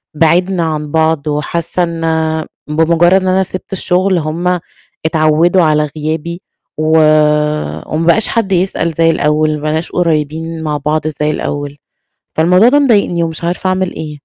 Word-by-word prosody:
بِعدنا 170 +3 +2
عن 150 -2 -3
بعض 160 -1 +1
وحاسّة 160 +4 -1
إن 165 -1 -4 0.6
بمجرّد 165 +3 +2
إن 185 - -2
أنا 190 +1 +2
سِبت 185 +1 -7
الشغل، 185 0 +1
هُم 170 +3 -1 0.5
اتعوّدوا 160 +3 +3
على 150 -2 +2
غيابي، 160 +3 -4 0.4
و 155 0 0 1.0
وما 165 - -1
بقاش 210 +6 +3
حد 225 -4 -1
يسأل 180 -2 0
زي 165 +1 +3
الأول، 155 0 +1
ما 150 - -7
بقيناش 155 +2 -2
قُريّبين 160 -1 -2
مع 150 -1 -1
بعض 150 +2 -1
زي 150 0 -1
الأول، 145 -1 -4 0.6
فالموضوع 180 +7 +4
ده 285 +3 +4
مضايقني 205 -11 +2
ومش 165 0 -3
عارفة 175 +2 -1
أعمل 185 -1 -1
إيه. 150 -1 -6
165 Hz, 145 wpm, -14 LUFS, 155-180 Hz, 1.0 s, فالموضوع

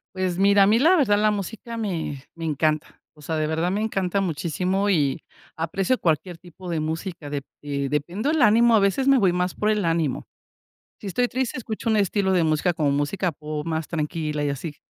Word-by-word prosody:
Pues 185 -2 -1
mira, 200 +1 +5
a - - +4
mí, 215 +2 +4
la 330 +9 +5
verdad, 205 -9 +3
la 215 0 +3
música 215 +3 -5
me 170 -10 -3
me 165 - -8
encanta, 155 0 -1 0.2
o 150 - -17
sea, 160 +2 -3
de 155 0 0
verdad 160 +3 0
me 200 - -1
encanta 200 -3 -1
muchísimo 185 +3 -1
y 145 -8 +1 0.3
aprecio 190 +9 0
cualquier 170 0 -1
tipo 180 +1 -11
de 165 -2 -1
música. 160 0 -4
De 145 -1 -3 0.2
dependo 145 - -2
del 315 -1 +1
ánimo, 230 +1 +5
a - - +5
veces 200 +7 +1
me 275 -1 +6
voy 190 -3 +3
más 180 0 -1
por 215 - 0
el 210 -4 +1
ánimo. 165 -5 0 0.8
Si 205 - -6
estoy 245 +6 +1
triste, 260 -1 -2
escucho 225 -2 -4
un 220 - +3
estilo 200 -1 +1
de 180 -3 +3
música, 155 +3 +1
como 150 -4 +1
música 145 +6 0
pop 150 0 -6
más 160 -1 -2
tranquila 150 -2 -2
y 145 - 0
así, 145 +2 -6
180 Hz, 205 wpm, -24 LUFS, 155-205 Hz, 0.8 s, me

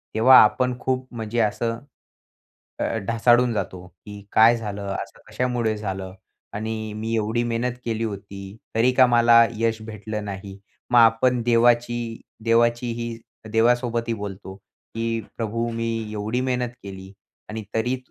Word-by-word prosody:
तेव्हा 130 +4 +7
आपण 125 +3 +2
खूप 130 0 -2
म्हणजे 115 0 -3
असं 115 +2 -1 1.0
अ, - - -1 0.2
ढासाळून 120 +1 +3
जातो 90 -4 -4
की 100 +3 -12
काय 115 +2 +6
झालं, 105 -3 -5 0.2
असं - - -13
कशामुळे 120 -3 -1
झालं? 95 -2 -5 0.4
आणि 110 0 -4
मी 110 +1 -3
एवढी 110 +2 0
मेहनत 120 +1 -1
केली 115 -1 -2
होती, 100 -1 -7 0.2
तरी 120 +3 +3
का 130 - +8
मला 120 -1 +6
यश 115 0 0
भेटलं 110 -1 -6
नाही. 100 0 -7 0.3
मग 120 - +5
आपण 120 +2 +4
देवाची 120 0 +2 0.2
देवाची 120 +1 +2
ही 115 0 -5 0.4
देवासोबतही 115 0 +1
बोलतो, 100 -2 -7
की 115 +3 -5 0.2
प्रभू 115 +1 -2
मी 115 0 -2 0.2
एवढी 110 +4 -2
मेहनत 125 -1 -1
केली 95 -1 -9 0.4
आणि 110 0 -5
तरी 120 +3 0
115 Hz, 135 wpm, -23 LUFS, 105-120 Hz, 1.0 s, का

